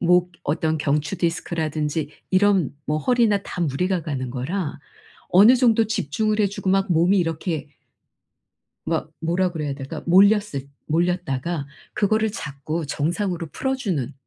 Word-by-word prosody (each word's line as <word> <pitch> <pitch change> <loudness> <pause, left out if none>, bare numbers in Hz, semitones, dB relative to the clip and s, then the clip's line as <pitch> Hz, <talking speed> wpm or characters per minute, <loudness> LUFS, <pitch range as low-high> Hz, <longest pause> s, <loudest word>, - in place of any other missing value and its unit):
목 180 0 +3
어떤 160 +2 0
경추 150 +4 0
디스크라든지 160 -3 -2 0.2
이런 185 -7 +3
뭐 150 +1 0
허리나 225 -1 +2
다 180 - -6
무리가 175 +3 0
가는 130 -5 -4
거라 145 +6 -3 0.5
어느 215 +8 +7
정도 230 -3 +4
집중을 215 +4 0
해 205 - +4
주고 195 -1 -5
막 195 -1 +2
몸이 175 +5 +4
이렇게 165 -2 -2 1.2
막 - - -2
뭐라 175 +3 +1
그래야 150 -4 -3
될까? 135 -1 -7
몰렸을 195 -6 +4 0.2
몰렸다가 170 -3 -1 0.3
그거를 215 +1 +2
자꾸 155 -1 -4
정상으로 170 +4 -2
풀어 265 0 -1
주는 160 - -2
170 Hz, 290 characters per minute, -23 LUFS, 150-200 Hz, 1.2 s, 어느